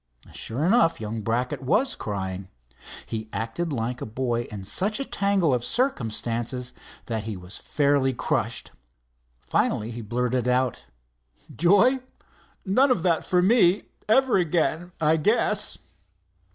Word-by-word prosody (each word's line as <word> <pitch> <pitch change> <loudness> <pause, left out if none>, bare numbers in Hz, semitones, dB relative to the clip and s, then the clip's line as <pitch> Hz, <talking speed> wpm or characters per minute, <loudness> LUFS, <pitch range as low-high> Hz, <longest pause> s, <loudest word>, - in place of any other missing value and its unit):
Sure 130 +8 -3
enough, 195 -3 +3
young 110 0 -4
Brackett 120 +6 -1
was 220 - +1
crying. 95 -2 -4 0.6
He 110 -1 -5
acted 150 +10 -3
like 120 -1 -3
a - - -3
boy 120 +1 -2
in 105 -3 -7
such 200 - -1
a 275 - -2
tangle 200 - +1
of 120 -1 0
circumstances 120 - -1 0.3
that 110 -2 -3
he 110 -3 -4
was 90 +2 -8
fairly 140 -2 +2
crushed. 125 - -2 0.7
Finally 110 +2 0
he 120 +1 -6
blurted 125 +2 -1
out: 125 -1 0 0.7
"Joy? 205 - +4 0.7
None 255 +9 +4
of 220 -10 +1
that 170 -3 +2
for 180 -1 +2
me, 195 -2 +4 0.3
ever 265 0 +4
again, 175 0 0
I 160 +1 +3
guess." 210 +10 +1
130 Hz, 130 wpm, -25 LUFS, 115-185 Hz, 0.7 s, Joy